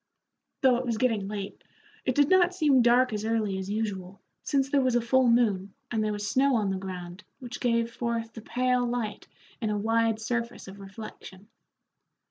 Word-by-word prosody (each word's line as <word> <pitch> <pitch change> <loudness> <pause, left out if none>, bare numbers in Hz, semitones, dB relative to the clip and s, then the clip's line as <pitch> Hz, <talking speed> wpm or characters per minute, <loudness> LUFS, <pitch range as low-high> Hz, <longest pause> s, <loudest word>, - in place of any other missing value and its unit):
Though 255 -2 +5
it 255 - -3
was 230 -2 0
getting 220 -5 +1
late, 200 -1 -6 0.4
it 255 - 0
did 285 -1 +4
not 365 0 +4
seem 290 -7 +4
dark 240 +1 +4
as 210 0 -3
early 220 -3 0
as 190 0 -5
usual, 200 -3 -3 0.2
since 275 -2 +1
there 280 0 +2
was 255 -2 +1
a - - +5
full 255 +2 +3
moon 210 -5 +2 0.2
and 220 -2 0
there 215 - 0
was 205 0 -3
snow 270 +2 +3
on 210 -4 +1
the 190 - -2
ground 185 0 -7
which 245 -1 -8
gave 235 -1 0
forth 230 -1 -3
a 225 - -7
pale 250 +2 +1
light 235 -4 -3 0.3
in 220 - -1
a 210 - 0
wide 225 +1 +1
surface 235 0 -3
of 195 +1 -10
reflection. 200 0 -11
230 Hz, 190 wpm, -27 LUFS, 205-250 Hz, 0.4 s, Though